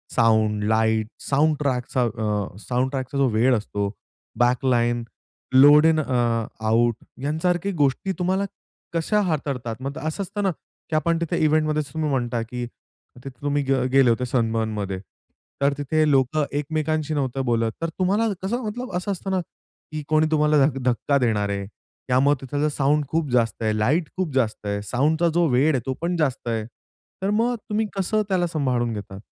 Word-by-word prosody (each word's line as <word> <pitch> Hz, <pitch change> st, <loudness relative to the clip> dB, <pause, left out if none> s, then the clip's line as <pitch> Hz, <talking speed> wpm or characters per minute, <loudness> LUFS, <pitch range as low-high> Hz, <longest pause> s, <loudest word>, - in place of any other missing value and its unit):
Sound, 110 Hz, -2 st, +3 dB
light, 110 Hz, 0 st, +2 dB, 0.2 s
soundtrack, 140 Hz, -3 st, +1 dB
साउंडट्रॅकचा 125 Hz, +4 st, -2 dB
अ, 140 Hz, -, +2 dB
जो 135 Hz, -, +4 dB
वेळ 120 Hz, +3 st, +3 dB
असतो 100 Hz, -2 st, -2 dB, 0.5 s
backline, 120 Hz, -1 st, +2 dB, 0.5 s
load 145 Hz, +4 st, +8 dB
in 160 Hz, -1 st, +4 dB
a, 155 Hz, -, -1 dB, 0.6 s
out 115 Hz, +1 st, +3 dB, 0.3 s
यासारख्या 175 Hz, +6 st, 0 dB
गोष्टी 145 Hz, +6 st, +1 dB
तुम्हाला 190 Hz, +2 st, +1 dB, 0.5 s
कशा 210 Hz, +6 st, +1 dB
हाताळतात? 140 Hz, -, -2 dB
मग 140 Hz, +3 st, -4 dB
असं 160 Hz, +5 st, -3 dB
असतं 205 Hz, +2 st, -4 dB
ना 195 Hz, -, +2 dB, 0.4 s
की 155 Hz, -, -1 dB
आपण 165 Hz, +2 st, +2 dB
तिथे 170 Hz, -, -1 dB
इव्हेंटमध्येच 155 Hz, -1 st, +1 dB
तुम्ही 155 Hz, -1 st, -1 dB
म्हणता 120 Hz, -3 st, -1 dB
की 120 Hz, +2 st, -5 dB
तिथे 125 Hz, +2 st, -14 dB
तुम्ही 145 Hz, 0 st, 0 dB
ग 135 Hz, -, +3 dB
गेले 135 Hz, -2 st, +5 dB
होते 120 Hz, +2 st, +1 dB
सनबर्नमध्ये. 110 Hz, -5 st, -1 dB, 0.6 s
तर 140 Hz, 0 st, +3 dB
तिथे 155 Hz, +2 st, +1 dB
लोक 135 Hz, +2 st, +2 dB
एकमेकांशी 155 Hz, +1 st, -1 dB
नव्हतं 135 Hz, -2 st, -1 dB
बोलत 115 Hz, -2 st, +1 dB
तर 165 Hz, -, -1 dB
तुम्हाला 200 Hz, +5 st, +2 dB, 0.2 s
कसं 235 Hz, +4 st, -2 dB, 0.3 s
असं 200 Hz, +3 st, -3 dB
असतं 195 Hz, +1 st, -4 dB
ना 190 Hz, -, +1 dB, 0.5 s
की 155 Hz, -1 st, -4 dB
कोणी 155 Hz, 0 st, +3 dB
तुम्हाला 150 Hz, -2 st, +4 dB, 0.2 s
धक्का 130 Hz, +3 st, +2 dB
देणार 110 Hz, -6 st, +1 dB
आहे, 100 Hz, 0 st, -2 dB, 0.4 s
त्यामुळे 135 Hz, +3 st, +3 dB
तिथलं 145 Hz, +3 st, -1 dB
साउंड 145 Hz, +1 st, +1 dB
खूप 160 Hz, -2 st, 0 dB
जास्त 115 Hz, -3 st, +1 dB
आहे, 110 Hz, -1 st, +1 dB
लाईट 150 Hz, +10 st, +1 dB
खूप 180 Hz, -7 st, -2 dB
जास्त 110 Hz, -5 st, 0 dB
आहे, 100 Hz, 0 st, -1 dB
साउंडचा 150 Hz, -, +1 dB
जो 170 Hz, -1 st, +3 dB
वेळ 135 Hz, +6 st, +3 dB
आहे 130 Hz, -, 0 dB
तो 130 Hz, -, -1 dB
पण 175 Hz, +1 st, 0 dB
जास्त 135 Hz, -6 st, -1 dB
आहे. 110 Hz, -2 st, -1 dB, 0.6 s
तर 195 Hz, -, 0 dB
मग 230 Hz, +4 st, +1 dB
तुम्ही 215 Hz, +1 st, +1 dB
कसं 215 Hz, +3 st, +1 dB
त्याला 180 Hz, -2 st, +1 dB
सांभाळून 130 Hz, -7 st, 0 dB
घेतात? 100 Hz, -2 st, -7 dB
140 Hz, 160 wpm, -23 LUFS, 120-155 Hz, 0.6 s, load